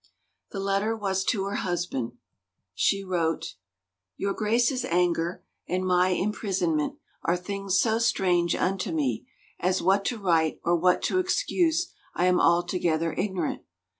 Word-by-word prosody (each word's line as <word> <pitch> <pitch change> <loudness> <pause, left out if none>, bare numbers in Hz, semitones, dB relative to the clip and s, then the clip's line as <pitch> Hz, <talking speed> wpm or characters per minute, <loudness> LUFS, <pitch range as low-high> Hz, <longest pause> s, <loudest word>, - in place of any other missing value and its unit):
The 195 - -6
letter 200 +3 0
was 190 -2 -1
to 200 -3 +1
her 200 +1 -2
husband. 175 -10 -2 0.6
She 195 - +1
wrote: 170 - -1 0.3
" 95 0 -61
Your 200 0 -1
Grace's 235 +5 +1
anger 170 0 0 0.2
and 185 +1 -1
my 180 0 +3
imprisonment 185 -5 0 0.3
are 175 - +1
things 195 +1 -1
so 225 -1 +2
strange 180 -6 +2
unto 185 -1 -1
me, 140 -8 -1 0.3
as 185 +1 +1
what 195 +2 +3
to 245 - -1
write 165 -6 +1
or 175 - +3
what 180 +1 +2
to 370 - +1
excuse 355 -3 +1 0.2
I 175 - +2
am 180 -1 +4
altogether 170 -1 +2
ignorant. 185 -4 -2
185 Hz, 140 wpm, -26 LUFS, 170-200 Hz, 0.6 s, am